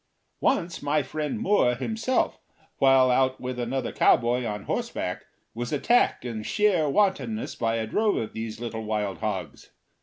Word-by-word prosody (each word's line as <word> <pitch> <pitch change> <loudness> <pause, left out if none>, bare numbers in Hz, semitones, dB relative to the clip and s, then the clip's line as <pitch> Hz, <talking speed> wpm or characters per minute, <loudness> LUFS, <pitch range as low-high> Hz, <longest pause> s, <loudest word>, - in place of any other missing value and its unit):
Once 170 -3 0
my 145 +1 +1
friend 155 - -3
Moore 200 - +3
himself, 225 - -1 0.4
while 135 -1 +5
out 130 +1 +2
with 125 0 -5
another 125 +2 -2
cowboy 120 +1 +3
on 105 -2 -4
horseback, - - -3 0.3
was 120 +1 -4
attacked 155 - +2
in 115 -3 -4
sheer 180 - +2
wantonness 210 +5 0
by 115 -1 -1
a 110 -1 -1
drove 210 - +1
of 110 - -3
these 110 0 -5
little 115 -2 -5
wild 105 -2 -2
hogs. 95 -9 -4
125 Hz, 150 wpm, -26 LUFS, 115-165 Hz, 0.4 s, while